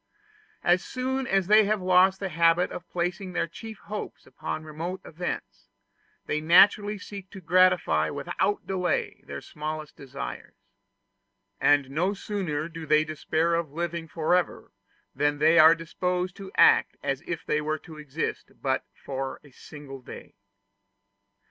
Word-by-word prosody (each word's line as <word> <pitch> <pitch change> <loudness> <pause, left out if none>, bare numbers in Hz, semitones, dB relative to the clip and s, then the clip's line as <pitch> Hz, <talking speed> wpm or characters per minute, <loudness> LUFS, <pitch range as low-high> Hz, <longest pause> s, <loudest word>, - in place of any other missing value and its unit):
As 175 +1 +3
soon 260 +1 -2
as 195 -3 +2
they 210 +2 +6
have 215 +1 +1
lost 185 +1 +4
the 195 - -3
habit 170 +1 +3
of 180 - -8
placing 180 +2 -3
their - - 0
chief 220 +6 -9
hopes 210 0 -7
upon 155 - -5
remote 165 +4 -5
events, 100 - -6 0.6
they 150 - -1
naturally 205 +5 +5
seek 200 -1 -9
to 195 - -10
gratify 175 - +3
without 200 - -1
delay 180 -3 -1
their 70 0 -6
smallest 155 0 -6
desires; 140 0 -8 1.0
and 145 -2 +3
no 180 +8 0
sooner 180 -8 -3
do 165 -1 -8
they 155 +1 +5
despair 155 +2 -1
of 165 -4 -1
living 170 0 -3
forever, 170 +3 0 0.4
than 145 0 +1
they 160 +3 +5
are 160 +1 +9
disposed 180 +2 -2
to 195 -1 -9
act - - +5
as 135 0 -1
if 170 -2 -4
they 150 - +1
were 155 +1 -1
to 155 -1 -12
exist 150 +1 -4
but 135 -2 0 0.2
for 135 0 -4
a 145 - -17
single 135 0 -11
day. - - -11
170 Hz, 145 wpm, -27 LUFS, 150-185 Hz, 1.0 s, are